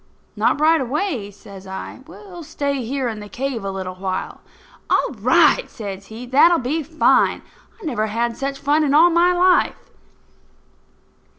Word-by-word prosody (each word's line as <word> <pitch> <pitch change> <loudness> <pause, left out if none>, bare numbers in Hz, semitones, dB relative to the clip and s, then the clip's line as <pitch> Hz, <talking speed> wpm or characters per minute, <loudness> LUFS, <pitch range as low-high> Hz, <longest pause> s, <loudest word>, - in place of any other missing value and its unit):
"Not - - +1
right 315 0 +4
away," 265 - -2
says 195 -1 -13
I. 190 +6 -7
"We'll 365 0 -12
stay 285 -4 -3
here 260 +2 -2
in 220 -2 -5
the 210 0 -10
cave 255 -3 -4
a 195 - -3 0.2
while." 185 0 -5 0.5
"All - - +1
right!" - - +3
says 195 -3 -8
he. 225 +3 -9
"That'll 295 +7 +5
be 290 +5 -2
fine. 315 +2 +2 0.4
I 420 - -11
never 235 -8 -1
had 230 +2 -2
such 275 0 -4
fun 295 +3 +1
in 285 -1 +1
all 340 +3 +6
my 345 +2 +4
life." 360 0 +3
275 Hz, 155 wpm, -20 LUFS, 220-320 Hz, 0.5 s, all